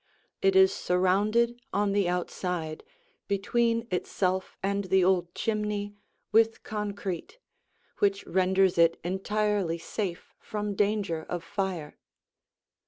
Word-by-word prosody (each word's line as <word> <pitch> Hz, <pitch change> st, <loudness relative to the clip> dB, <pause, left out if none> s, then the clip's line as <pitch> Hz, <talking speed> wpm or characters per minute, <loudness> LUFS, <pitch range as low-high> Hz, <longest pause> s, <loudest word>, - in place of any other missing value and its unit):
It 390 Hz, -1 st, +3 dB
is 380 Hz, 0 st, +6 dB
surrounded 210 Hz, +7 st, +2 dB
on 205 Hz, 0 st, +1 dB
the 200 Hz, -3 st, +2 dB
outside, 175 Hz, -2 st, -3 dB, 0.4 s
between 230 Hz, +3 st, +1 dB
itself 185 Hz, +1 st, -1 dB
and 200 Hz, 0 st, 0 dB
the 190 Hz, 0 st, +3 dB
old 175 Hz, -2 st, +1 dB
chimney, 210 Hz, -2 st, -2 dB, 0.4 s
with 225 Hz, +1 st, +3 dB
concrete, 205 Hz, -, -4 dB, 0.6 s
which 400 Hz, -1 st, +2 dB
renders 190 Hz, -1 st, +2 dB
it 165 Hz, 0 st, +4 dB
entirely 195 Hz, -1 st, 0 dB
safe 180 Hz, 0 st, -5 dB
from 210 Hz, -1 st, -3 dB
danger 200 Hz, -5 st, 0 dB
of 175 Hz, -1 st, -3 dB
fire. 185 Hz, -5 st, -4 dB
200 Hz, 105 wpm, -28 LUFS, 180-215 Hz, 0.6 s, is